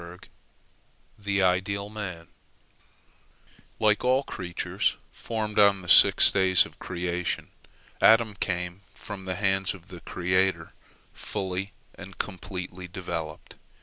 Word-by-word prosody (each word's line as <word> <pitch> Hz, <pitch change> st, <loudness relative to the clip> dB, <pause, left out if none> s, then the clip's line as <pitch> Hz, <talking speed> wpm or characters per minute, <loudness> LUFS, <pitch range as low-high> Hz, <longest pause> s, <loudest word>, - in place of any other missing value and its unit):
" -, -, -36 dB
THE 100 Hz, -1 st, +1 dB
IDEAL 100 Hz, +2 st, 0 dB
MAN 95 Hz, -6 st, -7 dB, 1.5 s
Like 105 Hz, -1 st, +2 dB
all 130 Hz, +2 st, +3 dB
creatures 90 Hz, -8 st, -2 dB
formed 110 Hz, -2 st, -3 dB
on 100 Hz, -2 st, +5 dB
the -, -, -11 dB
six -, -, +8 dB
days 95 Hz, -2 st, +4 dB
of -, -, -15 dB
creation, 90 Hz, 0 st, -3 dB, 0.5 s
Adam 110 Hz, -1 st, +5 dB
came 90 Hz, -1 st, -3 dB
from 100 Hz, -3 st, -8 dB
the 95 Hz, 0 st, -3 dB
hands 95 Hz, -1 st, 0 dB
of 90 Hz, -2 st, -16 dB
the 90 Hz, -, -9 dB
Creator 90 Hz, +2 st, -1 dB, 0.4 s
fully 95 Hz, +1 st, -4 dB, 0.2 s
and 95 Hz, -1 st, -12 dB
completely 90 Hz, -2 st, -6 dB
developed. 85 Hz, -4 st, -7 dB
95 Hz, 115 wpm, -26 LUFS, 90-100 Hz, 1.5 s, six